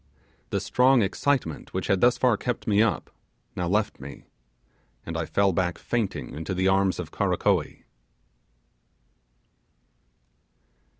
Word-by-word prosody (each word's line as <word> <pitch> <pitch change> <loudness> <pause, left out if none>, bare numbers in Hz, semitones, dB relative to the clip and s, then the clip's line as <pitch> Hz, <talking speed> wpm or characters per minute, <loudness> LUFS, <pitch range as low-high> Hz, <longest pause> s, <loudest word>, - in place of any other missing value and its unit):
The - - -1
strong 125 -1 +3
excitement 100 - -1
which - - -1
had 95 - +1
thus 125 0 +4
far 125 -3 +3
kept 120 +3 -4
me 105 -1 +3
up, 115 -2 0 0.4
now 90 - -2
left 105 +3 0
me, 70 +1 -10 0.8
and 85 - -5
I 80 -1 -2
fell 100 -1 +2
back 90 -1 -1
fainting 115 -5 -3
into 80 +4 -4
the 95 +1 +1
arms 95 -1 +2
of - - -6
Karakoee. - - 0
100 Hz, 125 wpm, -26 LUFS, 90-120 Hz, 0.8 s, thus